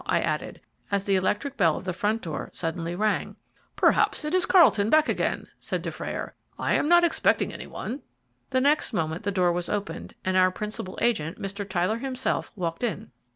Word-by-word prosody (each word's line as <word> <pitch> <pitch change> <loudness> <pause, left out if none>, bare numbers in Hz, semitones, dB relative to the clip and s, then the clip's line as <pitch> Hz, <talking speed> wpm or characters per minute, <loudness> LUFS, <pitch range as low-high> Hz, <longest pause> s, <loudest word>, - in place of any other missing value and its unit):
I - - +2
added, - - -3 0.3
as 200 -1 0
the 195 - +2
electric 210 +9 0
bell 165 -3 +3
of - - -8
the 185 - -2
front 210 +5 -1
door 160 -3 -4
suddenly 170 0 -3
rang. 215 +3 0 0.4
"Perhaps - - +3
it 300 - -2
is 370 -1 +3
Carlton 220 - +5
back 310 +2 +5
again," - - -1
said - - -3
Dufrayer; - - -5 0.2
"I - - 0
am 300 - +2
not 345 0 +6
expecting 340 - +2
any - - -8
one." 260 +6 -5 0.5
The 260 -1 +2
next 285 -1 +2
moment 160 -3 -1
the 200 - -1
door 180 -2 +2
was 175 0 -2
opened, 205 -1 -4
and 185 0 +1
our 185 0 +5
principal 190 -1 -5
agent, 175 -9 0
Mr. 200 +1 -5
Tyler 190 +4 0
himself, 260 0 -2
walked 170 0 -3
in. 220 -2 -3
200 Hz, 190 wpm, -26 LUFS, 180-255 Hz, 0.5 s, not